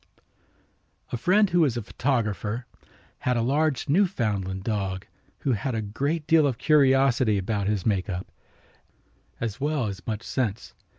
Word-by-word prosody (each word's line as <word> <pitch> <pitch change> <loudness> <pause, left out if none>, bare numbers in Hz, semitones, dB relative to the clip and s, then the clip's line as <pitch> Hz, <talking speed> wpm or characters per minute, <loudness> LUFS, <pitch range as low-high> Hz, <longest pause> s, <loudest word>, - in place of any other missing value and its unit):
A - - -1
friend 185 - +3
who 175 - +3
was 140 -8 +3
a 120 - -3
photographer 115 -2 -1 0.5
had 125 -1 0
a 115 - +1
large 145 +3 +1
Newfoundland 110 - 0
dog 95 -4 -2 0.4
who 135 - +1
had 125 +2 -1
a 110 - -1
great 140 +10 -2
deal 160 -2 +5
of 130 -4 -2
curiosity 135 -6 +4
about 100 +1 -1
his 105 -3 -1
make 100 -4 0
up, 90 0 -3 1.1
as 115 +2 -4
well 145 -3 0
as 100 -2 -6
much 110 -1 -3
sense. 115 -5 -2
120 Hz, 150 wpm, -26 LUFS, 105-140 Hz, 1.1 s, deal